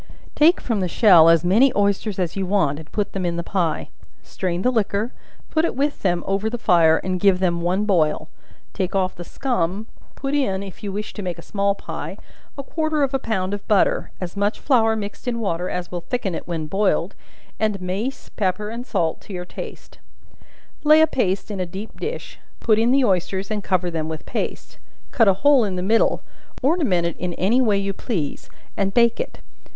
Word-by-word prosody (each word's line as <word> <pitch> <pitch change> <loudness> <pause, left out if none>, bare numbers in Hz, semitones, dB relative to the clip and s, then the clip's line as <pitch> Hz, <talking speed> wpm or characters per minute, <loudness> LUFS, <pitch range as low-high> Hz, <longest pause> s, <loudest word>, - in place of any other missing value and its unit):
Take 325 +4 +5
from 225 -4 -1
the 185 - 0
shell 175 -4 +7
as 165 -1 +5
many 230 +9 +5
oysters 200 0 +1
as 180 -3 -1
you 195 -1 -2
want 170 -7 +1
to 160 - -10
put 200 +5 -3
in 175 -3 -1
the 170 - -3
pie; 175 -3 -1 0.3
strain 180 -1 -3
the 250 - +3
liquor, 220 0 0 0.4
put 315 - +2
it 335 - 0
with 285 +2 -1
them 175 -3 +1
over 195 +3 0
the 240 - -3
fire 170 -7 +4
and 185 -1 -1
give 195 -1 +4
them 175 -2 0
one 185 +4 +1
boil; 165 -7 +1 0.5
take 190 -1 -2
off 185 -1 +1
the 175 - -8
scum, 200 -3 -2 0.3
put 275 0 -3
in, 200 -10 0
if 195 -2 -10
you 205 - -4
wish 210 +2 -5
to 210 - -6
make 180 -3 -4
a 170 - -10
small 200 -1 0
pie, - - -6 0.4
a 275 - -4
quarter 310 0 0
of 275 0 0
a 270 - +1
pound 195 -5 -2
of 205 - -6
butter, 210 -2 +2
as 180 0 -5
much 205 +2 0
flour 225 -5 +3
mixed 205 +2 -6
in 240 -1 0
water 180 -4 -1
as 180 -1 -4
will 175 -1 -4
thicken 195 0 -2
it - - -5
when 165 -3 -3
boiled, 190 +1 +1 0.5
and 215 -2 0
mace, 195 +9 -4
pepper, 210 +1 -1
and 235 +3 -6
salt 160 -1 -1
to 205 - -10
your 180 -1 -5
taste; - - -9 0.8
lay 305 +1 +7
a - - +8
paste 205 -9 -1
in 200 - -4
a 185 - 0
deep 195 +5 -8
dish, 455 +3 -5 0.2
put 220 -2 +3
in 230 +2 +3
the 265 0 +4
oysters 190 +1 0
and 210 -2 -2
cover 180 -2 0
them 160 -1 -3
with 160 -1 -6
paste; - - -5 0.3
cut 225 -3 +4
a 195 - +6
hole 285 -4 +6
in 195 -3 -2
the 180 - -2
middle, 220 +4 +2 0.4
ornament 265 - +2
it 170 - -2 0.2
any 220 +8 +3
way 215 -5 +3
you 195 0 -1
please, 185 - -4 0.3
and 195 -1 -1
bake 235 -1 +4
it. - - -5
200 Hz, 205 wpm, -22 LUFS, 180-225 Hz, 0.8 s, a